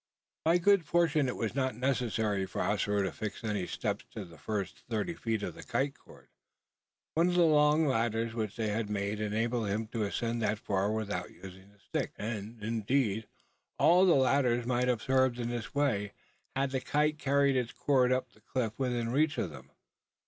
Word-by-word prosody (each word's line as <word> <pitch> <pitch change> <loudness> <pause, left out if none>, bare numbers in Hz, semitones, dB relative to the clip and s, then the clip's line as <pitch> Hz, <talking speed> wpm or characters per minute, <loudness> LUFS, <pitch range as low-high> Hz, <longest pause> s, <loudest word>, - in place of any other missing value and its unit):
By 165 +2 +5
good 195 +1 +4
fortune 155 -3 +2
it 125 - -2
was 115 -1 -2
not 130 -2 0
necessary 110 -6 0
for 80 - -5
Ossaroo 105 +1 +1
to 95 - -1
fix 110 +2 -6
any 105 -4 -1
steps - - -2
to - - -6
the 80 -2 -15
first 100 +2 -3
thirty 115 +9 -1
feet 110 -8 -2
of - - -3
the - - -11
kite 135 +1 -1
cord. - - -18 0.8
One 165 +2 +3
of 175 - 0
the 175 -1 +5
long 150 0 +4
ladders 115 -3 0
which 110 -3 -3
they 110 -2 -1
had 105 0 -2
made 105 0 -2
enabled 110 +2 0
him 105 +3 -1
to 115 - -3
ascend 115 +3 -1
that 110 0 +1
far 100 0 0
without 100 -5 -2
using 95 +1 -12
the 105 - -25
sticks; 100 - -4
and, 110 0 -5
indeed, 110 -1 0 0.5
all 175 +3 +5
of 190 - +6
the 175 - +6
ladders 130 -3 +3
might 125 0 +1
have 125 -3 0
served 130 -2 +2
in 120 -1 -2
this 120 +2 -5
way, 105 -9 +1 0.4
had 135 0 0
the 130 -1 -1
kite 150 +2 +1
carried 140 0 +3
its 125 -2 0
cord 130 -3 +2
up 130 -1 0
the 110 - -24
cliff 115 -1 -2
within 120 -3 0
reach 150 +2 +2
of 90 -8 -1
them. 70 -1 -12
115 Hz, 195 wpm, -31 LUFS, 105-135 Hz, 0.8 s, of